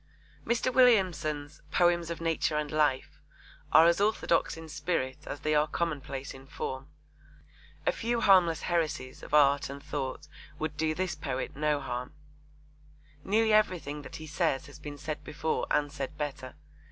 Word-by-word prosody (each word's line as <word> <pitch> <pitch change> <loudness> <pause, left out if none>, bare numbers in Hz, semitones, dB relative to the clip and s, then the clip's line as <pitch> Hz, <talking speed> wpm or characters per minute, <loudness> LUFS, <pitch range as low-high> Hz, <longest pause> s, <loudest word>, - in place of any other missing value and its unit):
Mr. 240 +2 +1
Williamson's 180 - +2
Poems 175 0 +2
of 170 - -4
Nature 165 -1 0
and 150 -1 -2
Life 150 -4 0 0.5
are 160 - +8
as 170 +3 +4
orthodox 205 -6 +1
in 160 0 -9
spirit 150 -5 -2
as 145 - -5
they 155 - +1
are 150 0 +3
commonplace 145 -4 -3
in 135 0 -13
form. 130 -1 -5 1.0
A - - +4
few 240 - -1
harmless 180 -6 +5
heresies 155 -7 -1
of - - -2
art 145 -1 +4
and 140 0 -8
thought 140 +1 -4 0.3
would 155 -1 -3
do 155 0 0
this 185 +1 -1
poet 130 -3 -4
no 150 0 +1
harm. 125 -1 -5 1.1
Nearly 220 +2 +2
everything 180 -9 +1
that - - -10
he 155 - -7
says 150 -2 0
has 145 - -13
been 145 -1 -7
said 150 0 -5
before 155 +2 -2
and 145 -1 +1
said 145 +1 -5
better. 140 -3 -5
150 Hz, 155 wpm, -29 LUFS, 145-170 Hz, 1.1 s, are